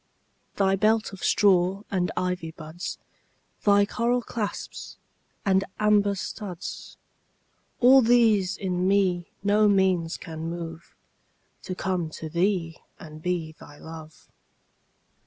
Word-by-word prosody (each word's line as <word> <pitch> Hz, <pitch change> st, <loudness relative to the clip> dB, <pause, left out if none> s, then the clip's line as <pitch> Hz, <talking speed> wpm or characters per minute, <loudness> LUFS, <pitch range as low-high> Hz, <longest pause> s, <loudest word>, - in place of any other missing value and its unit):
Thy 195 Hz, -1 st, +2 dB
belt 215 Hz, +1 st, +1 dB
of 190 Hz, -, -9 dB
straw 190 Hz, 0 st, +3 dB
and 180 Hz, -2 st, 0 dB
ivy 180 Hz, -3 st, -2 dB
buds, 160 Hz, +2 st, -7 dB, 0.7 s
Thy 205 Hz, -1 st, +5 dB
coral 240 Hz, +3 st, 0 dB
claps 210 Hz, -4 st, -5 dB, 0.5 s
and 190 Hz, -1 st, +3 dB
somber 205 Hz, -1 st, +3 dB
studs, 190 Hz, -2 st, -7 dB, 0.8 s
All 260 Hz, +2 st, +8 dB
these 225 Hz, -6 st, +3 dB
in 180 Hz, -1 st, -1 dB
me 185 Hz, -3 st, +2 dB, 0.2 s
no 210 Hz, +1 st, +4 dB
means 190 Hz, -4 st, +2 dB
can 160 Hz, 0 st, -6 dB
move 170 Hz, -1 st, -7 dB, 0.7 s
To 185 Hz, -, -5 dB
come 180 Hz, -4 st, -2 dB
to 160 Hz, -, -6 dB
thee 170 Hz, -1 st, 0 dB, 0.2 s
and 155 Hz, -1 st, -11 dB
be 175 Hz, -2 st, -2 dB
thy 145 Hz, 0 st, -13 dB
love. 160 Hz, -1 st, -11 dB
185 Hz, 115 wpm, -26 LUFS, 170-205 Hz, 0.8 s, All